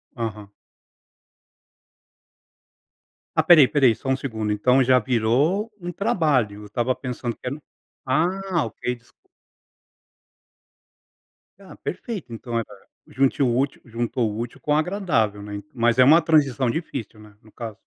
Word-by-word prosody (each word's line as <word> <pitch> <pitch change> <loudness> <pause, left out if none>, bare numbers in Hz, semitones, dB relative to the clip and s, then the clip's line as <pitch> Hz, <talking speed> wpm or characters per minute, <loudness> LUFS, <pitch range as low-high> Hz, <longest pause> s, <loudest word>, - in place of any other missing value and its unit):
Aham. 110 -3 -5 2.9
Ah - - +8
espera 170 -3 +7
aí - - +8
espera 140 +1 +2
aí, 120 - +6
só 135 - -6
um 130 - +2
segundo, 110 -6 -3
então 125 +6 +3
já 130 +1 +5
virou 130 - +1
um 175 -1 -5
trabalho, 155 - 0
eu - - -10
estava 120 +4 -1
pensando 125 -2 -5
que - - -17
era 125 - -2
um - - -11 0.5
ah, 175 +5 0
ok 125 - -4
desculpa. 125 - -26 2.3
Ah - - -13
perfeito 205 - -6
então, 115 0 -3
eh, - - -1 0.4
junte 135 +1 +1
o 120 -3 +2
útil 135 +2 -1
juntou 115 -1 -2
o 105 - -6
útil 120 +3 -6
com 150 - -3
o - - +4
agradável, 155 - 0
né, 100 0 -7
mas 120 -1 +2
é 130 - +7
uma 155 +6 +7
transição 140 -6 +2
difícil, 120 - -5
né, 105 -1 -16
no 110 - -20
caso. 115 -3 -7
125 Hz, 150 wpm, -23 LUFS, 115-150 Hz, 2.9 s, Ah